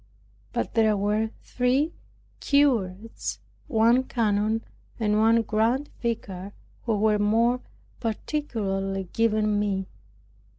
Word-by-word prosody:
But - - -2
there 220 -2 +3
were 210 +2 +1
three 260 +6 +1 0.5
curates, 230 -8 +1 0.3
one 235 -1 +4
canon, 220 -1 0 0.4
and 210 -1 +2
one 225 +1 +4
grand 230 +6 0
vicar, 200 -5 -3 0.3
who 220 -2 +2
were 210 0 +3
more 230 +4 +2 0.4
particularly 195 - -2
given 215 -2 +2
me. 195 -2 -1
220 Hz, 95 wpm, -26 LUFS, 205-235 Hz, 0.5 s, one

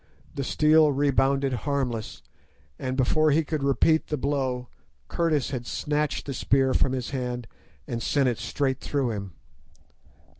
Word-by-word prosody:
The 140 - -3
steel 155 +2 +4
rebounded 135 -1 +2
harmless, 125 -3 -3 0.6
and 130 0 -3
before 155 +4 +3
he 155 +2 +3
could 155 -1 -3
repeat 140 +3 +2
the 150 - -2
blow 130 -3 -1 0.4
Curtis 155 -6 0
had 120 -3 -4
snatched 150 0 -1
the 140 - -4
spear 135 +1 +2
from 130 - +2
his 130 0 -3
hand 125 -3 -3 0.4
and 120 -4 -4
sent 140 +1 +2
it 120 -3 -1
straight 130 +3 -1
through 135 -5 -1
him. 100 -4 -6
135 Hz, 145 wpm, -26 LUFS, 125-145 Hz, 0.6 s, steel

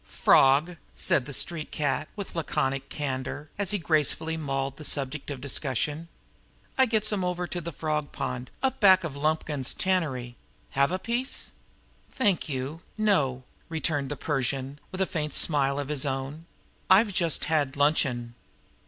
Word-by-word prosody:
"Frawg," 145 +6 +4 0.2
said 130 - +1
the - - -6
street 155 +2 -3
cat, 150 +1 -1
with 200 -3 -6
laconic 135 -4 -1
candor, 140 +1 -4
as 200 -3 0
he 205 - +2
gracefully 160 -1 +1
mauled 135 -3 -2
the 155 - -8
subject 140 0 -2
of 140 -3 -4
discussion. 145 +3 -2 0.7
"I 265 -1 +5
gets 215 -2 +1
'em 195 -3 0
over 180 0 -1
to 175 0 -4
the 170 +1 -5
frawg 150 -1 -2
pawnd 125 0 -3 0.2
up 265 0 +1
back 190 -3 +7
of 155 -4 -4
Lumkins's 150 -2 0
tannery. 135 -10 -1 0.3
Have 140 +3 +3
a 185 - +1
piece?" 240 +6 -2 0.6
"Thank 200 -11 +1
you, 140 +4 -4 0.2
no," 145 -12 +2 0.3
returned 155 -4 -1
the 145 - -4
Persian, 135 -1 -2
with 190 0 -3
a - - +4
faint 150 -4 -3
smile 140 -3 +3
of 145 0 -3
his 150 -3 -1
own. 140 +4 -3 0.4
"I've 200 +2 +6
just 170 -5 +1
had 145 -4 +1
luncheon." 130 -5 +2
150 Hz, 155 wpm, -27 LUFS, 135-175 Hz, 0.7 s, back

